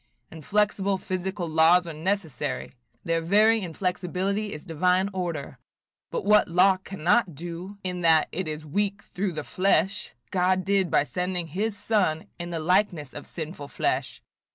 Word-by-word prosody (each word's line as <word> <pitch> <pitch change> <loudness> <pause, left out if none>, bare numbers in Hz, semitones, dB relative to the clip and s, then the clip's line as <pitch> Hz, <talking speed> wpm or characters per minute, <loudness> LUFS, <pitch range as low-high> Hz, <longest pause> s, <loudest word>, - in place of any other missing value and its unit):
Inflexible 200 +4 0
physical 185 -1 -3
laws 165 +3 +5
are 165 - -6
necessary; 165 -1 -3 0.3
their 165 0 0
very 215 +6 +4
inflexibility 185 +3 -2
is 150 - -8
divine 180 +3 +1
order; 170 -8 -4 0.5
but - - -3
'what 210 +1 +5
law 185 +3 +4
cannot 185 0 +1
do, 175 +5 -7
in 180 -1 -3
that 160 -2 +5
it 185 -2 -3
is 155 0 -5
weak 200 +5 -1
through 190 -1 -3
the 155 -1 -4
flesh, 195 +2 0 0.2
God 185 0 +2
did 195 -2 +2
by - - +3
sending 180 +2 -3
his 205 +6 -2
Son 185 -9 +1
in 175 0 -5
the 170 -1 -3
likeness 170 -4 +1
of 145 - -9
sinful 155 -3 -7
flesh.' - - -2
180 Hz, 150 wpm, -26 LUFS, 165-195 Hz, 0.5 s, laws